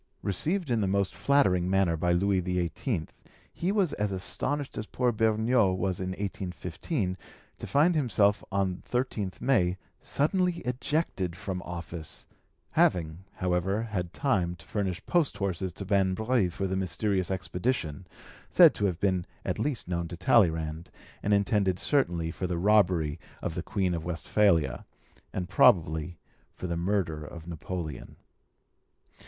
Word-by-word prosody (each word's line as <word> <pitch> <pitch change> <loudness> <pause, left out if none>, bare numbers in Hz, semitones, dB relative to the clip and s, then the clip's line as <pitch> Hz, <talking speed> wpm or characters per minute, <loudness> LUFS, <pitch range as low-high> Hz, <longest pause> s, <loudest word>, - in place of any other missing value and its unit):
Received 160 - 0
in 115 -2 +2
the 100 - +1
most 100 0 +1
flattering 95 -11 +2
manner 95 -3 +3
by 85 +2 0
Louis 95 +2 +2
XVIII, 90 - -1 0.5
he 180 +3 -1
was 200 -6 +1
as 105 -1 -1
astonished 135 +9 -1
as 110 - -4
poor 125 -1 +1
Beugnot 110 -2 +2
was 95 -1 -1
in 95 0 -3
1815, 95 - -3 0.4
to - - -6
find 155 +5 +4
himself 110 -9 +2
on 95 -2 0
13th 120 -6 -2
May 95 -9 +2 0.2
suddenly 180 +5 +1
ejected 125 - -1
from 90 0 -4
office, 85 -2 -6 0.5
having, 85 +1 +1
however, 90 +4 0
had 95 -6 -3
time 95 -9 0
to - - -16
furnish 100 -3 -3
post 160 -11 +1
horses 95 -2 -2
to 100 - -7
Manbreuil 100 +2 +2
for 95 +3 -3
the 95 0 -1
mysterious 95 0 0
expedition, 90 - -2 0.4
said - - +7
to 105 - -1
have 90 -3 0
been 95 -3 0 0.2
at - - -2
least 140 -10 -1
known 85 -1 -2
to 85 0 -7
Talleyrand, 80 -4 +2 0.3
and 105 - -1
intended 100 -2 +2
certainly 90 - +1
for 90 - -3
the 90 -1 -2
robbery 90 -6 +3 0.2
of - - -3
the - - -3
Queen 95 -2 -1
of 85 -2 -3
Westphalia, 85 - +1 0.5
and 90 -1 -3
probably 80 -3 +3 0.4
for - - -7
the 85 -1 -2
murder 85 -3 -1
of 80 +2 -9
Napoleon. 85 -3 -6
95 Hz, 145 wpm, -28 LUFS, 85-110 Hz, 0.5 s, said